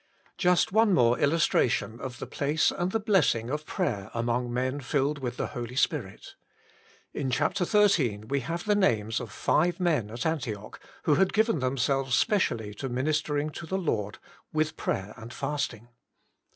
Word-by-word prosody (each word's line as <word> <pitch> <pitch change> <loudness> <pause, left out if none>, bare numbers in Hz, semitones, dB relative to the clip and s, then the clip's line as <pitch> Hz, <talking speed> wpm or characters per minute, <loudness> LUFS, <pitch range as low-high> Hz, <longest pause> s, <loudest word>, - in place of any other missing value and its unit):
Just 180 -1 +3
one 215 -1 +4
more 120 -3 +3
illustration 135 -6 +2
of 125 -2 -6
the - - -6
place 150 +2 +1
and 175 +1 -2
the 225 - +1
blessing 155 - +2
of 150 +1 -3
prayer 100 0 -2
among 120 +1 -1
men 130 +3 -1
filled 145 +2 0
with 125 -2 -4
the - - -1
Holy 120 0 -5
Spirit. 140 - -1 0.8
In 135 - -2
chapter 180 +9 +1
xiii. 170 - +3
we 140 +4 0
have 170 +5 -4
the 210 - +3
names 115 - +1
of 120 -5 -7
five 170 - +1
men 155 - +1
at 120 +3 -5
Antioch 120 -10 -3 0.2
who 150 - +3
had 185 +7 +3
given 220 -5 +2
themselves 130 0 +1
specially 120 - +1
to 135 +6 -5
ministering 150 +3 -1
to 165 - -8
the 190 - -1
Lord 110 - -2 0.3
with 155 0 0
prayer 95 +3 -3
and 110 +1 -9
fasting. 135 -5 -3
140 Hz, 165 wpm, -28 LUFS, 120-170 Hz, 0.8 s, one